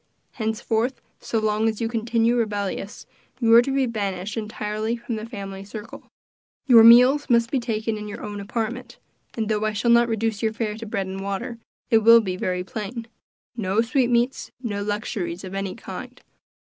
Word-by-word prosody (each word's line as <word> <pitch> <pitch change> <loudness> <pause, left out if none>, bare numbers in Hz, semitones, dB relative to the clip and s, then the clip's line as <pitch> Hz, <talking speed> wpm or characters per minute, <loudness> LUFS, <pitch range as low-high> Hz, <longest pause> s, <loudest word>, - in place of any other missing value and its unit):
Henceforth, 225 +2 -1 0.2
so 230 - -3
long 215 0 +1
as 220 - -4
you 230 - 0
continue 230 +1 +1
rebellious, 205 -3 -3 0.3
you 230 -2 +4
are 235 - +9
to 245 - -3
be 270 0 +2
banished 200 -4 -3
entirely 215 +1 -3
from 235 0 -6
the 215 +1 -6
family 195 -4 -7
circle; 210 +2 -10 0.6
your 240 -4 +8
meals 250 +5 +7
must 235 -1 +3
be 270 - +1
taken 220 -2 -2
in 210 - -6
your 205 - -7
own 205 -1 -5
apartment, 235 +4 -4 0.4
and 220 -2 -2
though 215 -1 0
I 215 0 0
shall 235 +3 +1
not 235 0 +5
reduce 225 -1 -1
your 220 -1 0
fare 220 -2 -3
to 225 0 -8
bread 200 -2 -2
and 190 +1 -6
water, 215 +5 -4 0.3
it 225 - +6
will 230 +1 +8
be 190 -5 -2
very 180 0 -2
plain 220 +4 -6 0.5
no 205 -1 +1
sweetmeats 245 0 +1
no 210 -5 -3
luxuries 200 -4 -3
of 190 0 -7
any 195 -1 -3
kind. - - -9
220 Hz, 180 wpm, -23 LUFS, 205-235 Hz, 0.6 s, are